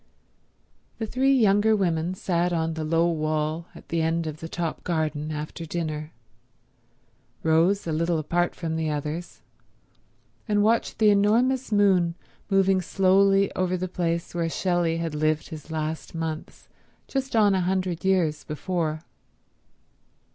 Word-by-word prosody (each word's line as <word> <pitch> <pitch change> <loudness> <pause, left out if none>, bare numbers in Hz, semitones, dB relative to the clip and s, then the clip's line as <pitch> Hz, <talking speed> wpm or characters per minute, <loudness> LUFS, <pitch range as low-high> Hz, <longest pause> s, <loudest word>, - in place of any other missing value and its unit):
The 225 - -3
three 260 +5 +1
younger 215 -1 +4
women 175 -2 0
sat 180 -1 0
on 165 -1 0
the 160 0 -4
low 165 +2 +2
wall 155 0 -1
at - - -14
the 165 -1 0
end 165 +1 0
of 155 -1 -5
the 165 - -7
top 170 -2 -3
garden 155 -2 -2
after 155 +2 -5
dinner, 155 -2 -4 1.3
Rose 165 +5 +3
a 165 - -2
little 165 +2 +1
apart 175 +3 0
from 160 -2 -3
the 160 -1 -1
others, 150 +3 -4 1.1
and 205 -1 +2
watched 225 +2 +1
the 215 -1 +5
enormous 235 +6 +2
moon 190 -5 +3 0.3
moving 195 -1 +3
slowly 195 +2 +3
over 185 0 0
the 185 +1 -3
place 170 -1 -2
where 170 -1 -1
Shelley 175 -1 0
had 165 -2 -3
lived 155 0 0
his 155 0 -9
last 160 +1 -4
months 160 -1 -5 0.4
just 270 -2 -3
on 210 -3 +5
a 190 - +1
hundred 185 -2 -1
years 180 -5 +1
before. 155 0 -3
170 Hz, 140 wpm, -25 LUFS, 160-195 Hz, 1.3 s, the